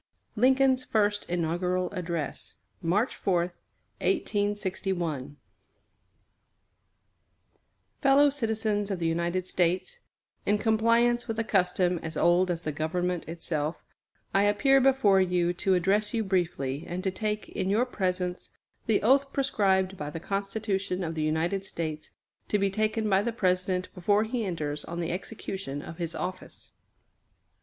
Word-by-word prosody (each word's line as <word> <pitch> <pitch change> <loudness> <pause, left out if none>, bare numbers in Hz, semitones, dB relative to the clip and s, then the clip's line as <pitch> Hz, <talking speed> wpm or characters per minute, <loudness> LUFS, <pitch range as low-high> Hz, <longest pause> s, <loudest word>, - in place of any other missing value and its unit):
LINCOLN'S 260 +2 +4
FIRST 205 -3 0
INAUGURAL 175 +1 0
ADDRESS 170 -5 -4 0.3
MARCH 195 +8 +1
4, 185 -3 +1 0.6
1861 190 - -1 2.6
FELLOW 280 +1 +6
CITIZENS 220 -5 0
OF 195 - -1
THE 170 - -3
UNITED 170 +2 0
STATES: 185 - 0 0.5
In 205 - +4
compliance 230 +3 +2
with 225 -1 -3
a 225 - +1
custom 180 -3 +1
as 160 -1 -5
old 175 +2 +3
as 175 -1 -2
the 155 - -2
government 170 +3 -2
itself, 160 -2 -3 0.5
I 195 - +4
appear 270 +7 +4
before 255 -8 +4
you 180 -1 +1
to 190 +2 +1
address 200 +5 +1
you 225 - +1
briefly, 165 -8 -1
and 180 +1 -4
to 190 - 0
take, 210 +2 -3
in 190 - -2
your 220 +5 +3
presence, 180 -6 -2 0.4
the 220 -2 +2
oath 275 +4 +4
prescribed 195 -8 +1
by 150 -2 -4
the 165 - -6
Constitution 195 0 -2
of 165 -1 -3
the 160 - -3
United 160 +5 0
States 160 -5 -5 0.4
to 210 - +2
be 200 -1 +1
taken 215 +1 0
by 195 -1 +3
the 235 +3 -1
President 185 -3 0
before 205 +4 +2
he 225 0 -2
enters 150 -5 -3
on 170 0 -6
the 170 -1 -2
execution 190 -6 -5
of 165 - -9
his 170 -1 -3
office. 185 0 -6
190 Hz, 135 wpm, -28 LUFS, 175-215 Hz, 2.6 s, FELLOW